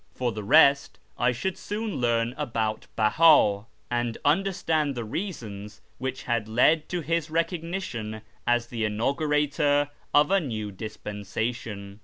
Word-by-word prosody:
For 125 -2 -1
the 105 -1 -6
rest, 140 +3 +5 0.2
I 125 +1 +2
should 185 +10 -3
soon 210 0 -4
learn 120 -1 +1
about 115 -7 -2
Bella, 110 -3 +4 0.2
and 120 -1 -1
understand 160 -3 +1
the 120 - -3
reasons 110 - -6 0.2
which 130 0 -4
had 115 -3 -1
led 150 +8 +3
to 175 -1 -2
his 165 0 -1
recog 165 +1 -1
nition 115 - -5 0.3
as 120 0 +2
the 120 -1 -6
inaugurator 145 +5 +1 0.2
of 150 +4 +4
a 195 - +5
new 110 - -4
dispensation. 105 0 -5
125 Hz, 135 wpm, -26 LUFS, 110-155 Hz, 0.3 s, rest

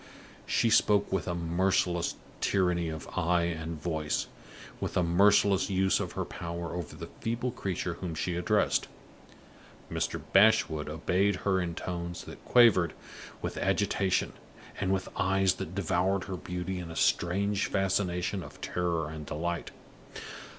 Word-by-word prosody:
She 115 - +2
spoke 105 -2 +4
with 95 -4 -1
a 85 - -1
merciless 85 +1 +1 0.2
tyranny 90 -3 +1
of 80 -3 -6
eye 85 +1 +1
and 80 -1 -3
voice 80 -2 -1 0.5
with - - -3
a 90 - +3
merciless 100 +3 +4
use 95 0 +2
of - - -4
her - - -2
power 85 0 -5
over 85 -3 -5
the - - -7
feeble 120 +2 -2
creature 95 -6 -3
whom 85 -1 -5
she 85 +2 -2
addressed. 100 +4 +1 1.0
Mr. - - -1
Bashwood 95 -7 +4
obeyed 90 +5 +1
her 95 -2 +3
in 85 -1 -3
tones 85 -1 -4
that - - -11
quavered 110 -9 +5 0.5
with - - -3
agitation, 95 -2 +1 0.5
and 95 -1 0
with 95 -1 0
eyes 95 0 +2
that 85 - -5
devoured 95 +1 +1
her 95 - -5
beauty 90 +1 -4
in 85 -2 -6
a 80 - -7
strange 100 +4 +1
fascination 95 -1 0
of 75 -3 -11
terror 85 -3 -1
and 75 -1 -7
delight. 85 +3 -3
90 Hz, 145 wpm, -29 LUFS, 85-95 Hz, 1.0 s, quavered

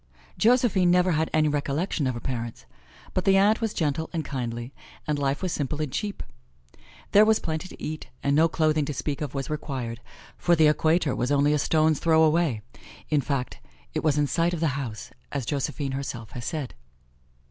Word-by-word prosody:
Josephine 225 -6 +3
never 180 +1 +4
had 160 0 +1
any 155 -1 +3
recollection 145 +2 -1
of 130 - -1
her - - -4
parents. 120 -2 -5 0.5
But 185 - 0
the 195 -1 +4
aunt 210 +4 +4
was 225 -2 0
gentle 160 -2 -1
and 160 -4 -3
kindly, 120 -1 -4 0.3
and 150 -1 -1
life 140 +4 -1
was 185 - -1
simple 145 +1 -2
and 150 -4 -2
cheap. 205 +7 -3 0.9
There 205 - +7
was 220 0 +4
plenty 160 0 -3
to - - -13
eat, 155 0 -5 0.2
and 140 0 +2
no 160 +2 +5
clothing 155 -1 +1
to 145 - -4
speak 145 +2 -3
of 145 -2 -4
was 135 +1 -3
required, 130 -6 -4 0.4
for 175 - +3
the 160 -1 +5
Equator 155 -1 +3
was 125 +3 -1
only 145 +1 +3
a 150 - +2
stone's 155 0 +2
throw 160 -1 +4
away; 155 -8 +2 0.5
in 150 -2 +3
fact, 135 -2 -3 0.3
it - - -2
was 150 -2 +2
in 145 - +3
sight 170 +4 +1
of - - -5
the 165 -1 +2
house, 130 -6 -5 0.2
as 140 -4 -3
Josephine 140 +1 -2
herself 125 -5 -5
has 120 - -7
said. 150 -6 -4
150 Hz, 195 wpm, -26 LUFS, 135-165 Hz, 0.9 s, There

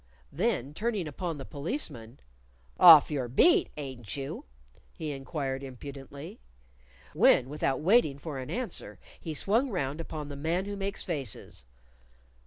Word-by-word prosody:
Then 170 - -1
turning 210 -2 -2
upon 165 +2 -4
the 135 - -7
Policeman, 140 - -5 0.6
"Off 160 -4 +10
your 135 -4 -1
beat, 145 - +4
ain't 130 -6 -6
you?" 140 +3 -5 0.5
he 155 -2 -4
inquired 135 -1 -4
impudently; 140 +2 -9 0.7
when, 125 - +5
without 140 -2 -1
waiting 175 - +4
for 140 -2 -6
an 130 - -7
answer, 250 -1 -4 0.2
he 160 -4 -5
swung 225 - +1
round 150 - -2
upon 155 -2 -6
the 145 - -7
Man 165 +6 -1
Who 205 0 -4
Makes 195 0 -2
Faces. 125 - -4
150 Hz, 135 wpm, -29 LUFS, 135-180 Hz, 0.7 s, Off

